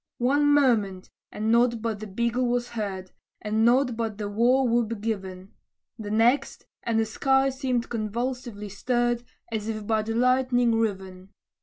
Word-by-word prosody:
One 285 +4 +2
moment, 220 -10 +2 0.2
and 220 +1 -1
nought 235 0 +3
but 220 -2 -3
the 215 - -7
bugle 235 +5 -1
was 240 0 -1
heard, 195 -5 -5 0.3
And 215 +1 0
nought 245 +1 +3
but 225 -2 -3
the 210 -1 -4
war 245 +5 +2
whoop 230 -2 0
given; 195 -3 -5 0.5
The 210 -1 -6
next, 230 +6 +1 0.2
and 230 -1 0
the 225 - +2
sky 270 +4 +2
seemed 255 -3 -2
convulsively 230 -1 -4
stirred, 240 +3 0 0.3
As 215 -1 -3
if 215 -2 -4
by 220 0 +1
the 225 +1 -4
lightning 250 -1 +2
riven. 190 -4 -3
230 Hz, 155 wpm, -26 LUFS, 210-245 Hz, 0.5 s, nought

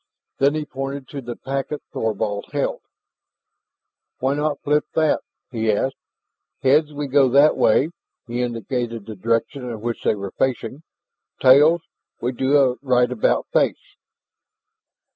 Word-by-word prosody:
Then 140 +2 +3
he 155 -1 -2
pointed 135 0 -5
to 140 - -6
the 120 -1 -6
packet 135 +2 -4
Thorvald 105 -2 -2
held. - - -1 1.4
"Why 135 +2 0
not 150 0 -1
flip 150 +1 +2
that?" 155 -1 +2 0.3
he 110 -3 +1
asked. 130 +6 0 0.7
"Heads, 145 +3 +4
we 145 0 -4
go 135 -1 +4
that 140 +4 +5
way 135 +8 +3 0.2
" - - -62
he 120 +1 -2
indicated 120 -1 -3
the 110 - -7
direction 115 +6 -1
in 115 -2 -5
which 120 0 -4
they - - +2
were 100 -1 -6
facing 130 +1 -1 0.6
"tails, 150 +6 +6 0.4
we 125 - -1
do 130 +3 +2
a 130 -3 +3
rightabout 125 -3 +2
face." - - 0
130 Hz, 140 wpm, -22 LUFS, 115-145 Hz, 1.4 s, tails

